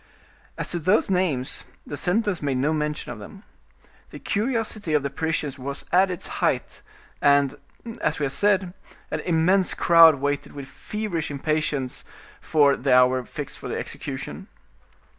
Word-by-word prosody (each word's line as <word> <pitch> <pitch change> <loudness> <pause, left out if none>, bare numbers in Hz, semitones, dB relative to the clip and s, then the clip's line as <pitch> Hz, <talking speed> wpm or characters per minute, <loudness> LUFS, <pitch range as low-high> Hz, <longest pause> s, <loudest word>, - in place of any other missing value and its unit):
As - - -3
to 175 - -1
those 185 +5 +2
names, 165 -9 0 0.2
the 145 - -6
sentence 185 +4 0
made 140 -3 -1
no 145 +5 +1
mention 150 -3 -2
of 120 - -8
them. 195 - -11 0.7
The - - -9
curiosity 215 -6 -1
of 145 - +2
the 140 - -3
Parisians 150 -2 -2
was 140 +2 -6
at 190 +2 +4
its 180 -2 -5
height, - - -1 0.4
and, 140 -1 +4 0.5
as - - 0
we 150 - -3
have 135 - -1
said, 190 +2 +2 0.4
an - - -1
immense 180 +3 +2
crowd 165 -3 +7
waited 145 +1 -2
with 140 -2 -8
feverish 205 +1 -4
impatience 145 -2 -2 0.5
the 140 -3 +3
hour 125 0 +5
fixed - - -7
for - - -7
the - - -3
execution. - - -6
155 Hz, 150 wpm, -24 LUFS, 140-185 Hz, 0.7 s, crowd